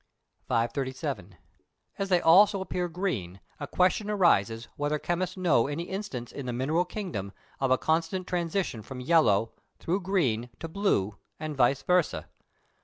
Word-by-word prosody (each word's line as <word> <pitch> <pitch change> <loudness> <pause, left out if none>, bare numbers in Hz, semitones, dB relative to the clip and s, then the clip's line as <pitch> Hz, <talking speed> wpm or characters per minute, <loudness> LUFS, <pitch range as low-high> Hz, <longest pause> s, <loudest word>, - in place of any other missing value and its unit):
537. 120 - -2 0.6
As 195 0 -1
they 180 -2 +4
also 195 +5 +6
appear 180 -2 -2
green, 125 - -3 0.2
a 145 - -5
question 185 +5 +1
arises 115 - +2
whether 145 +1 0
chemists 180 +4 -2
know 155 -11 +3
any 145 +4 -3
instance 180 - -5
in 140 -3 -6
the - - -1
mineral 150 +8 +1
kingdom 120 - -5 0.3
of 135 -1 +1
a 130 - +4
constant 165 +5 0
transition 175 - -2
from 125 +4 -8
yellow, 125 -7 +3 0.3
through 180 +4 -1
green, 140 - 0
to 165 - -5
blue, 160 - 0 0.2
and 155 -1 -4
vice 135 +1 +3
versâ. 180 -3 +1
155 Hz, 145 wpm, -28 LUFS, 120-180 Hz, 0.6 s, also